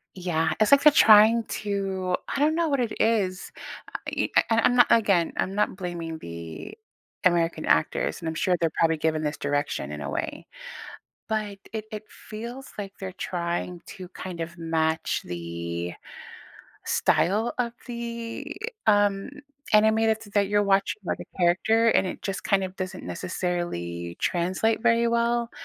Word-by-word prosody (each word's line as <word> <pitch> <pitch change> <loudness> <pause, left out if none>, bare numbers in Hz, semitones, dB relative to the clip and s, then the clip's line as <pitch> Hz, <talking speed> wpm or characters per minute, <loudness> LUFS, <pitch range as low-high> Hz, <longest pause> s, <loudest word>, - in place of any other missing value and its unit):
Yeah, 165 -3 0
it's 215 - +3
like 280 0 +7
they're 300 - +9
trying 225 -4 +7 0.2
to 195 -3 -1 0.2
I - - -1
don't 305 +2 +3
know 335 -1 +1
what 280 -2 +1
it 235 -3 -1
is. 200 -5 +1 0.4
I - - -5
e - - -1
uh, - - +8
I 225 - +3
I'm 245 - +3
not 245 - +6
again, 195 -7 +3
I'm 190 - -1
not 210 -1 0
blaming 170 -3 -5
the 85 - -8 0.5
American 170 -2 +2
actors, - - +1
and 165 - -4
I'm 160 - -3
sure 180 +3 +2
they're 165 -2 +1
probably 165 -1 +3
given 155 0 0
this 150 0 -2
direction 140 - -2
in 75 0 -6
a 70 - -4
way. - - -4 0.8
But 215 -2 -2
it 220 -1 -4
it 215 0 -6
feels 235 +5 -9
like 195 -1 -5
they're 190 -1 -6
trying 175 -1 -3
to 185 -3 -9
kind 180 -2 -7
of 170 +1 -5
match 160 -1 0
the 85 0 -5 0.9
style 215 +6 +2
of 240 -1 -1
the, 235 -1 -5 0.3
um, 205 -2 +3 0.4
anime 220 +1 +6
that's 220 0 0
that 200 -1 +3
you're 205 +1 +2
watching, 200 +1 +1
like - - -3
a - - -12
character, 205 +6 +3
and 195 - +3
it - - -6
just 195 0 -4
kind 195 -1 +2
of 185 0 -5
doesn't 185 -1 -5
necessarily 170 - -3
translate 185 +6 0
very 235 0 +3
well. 235 0 +1
190 Hz, 165 wpm, -26 LUFS, 165-220 Hz, 0.9 s, they're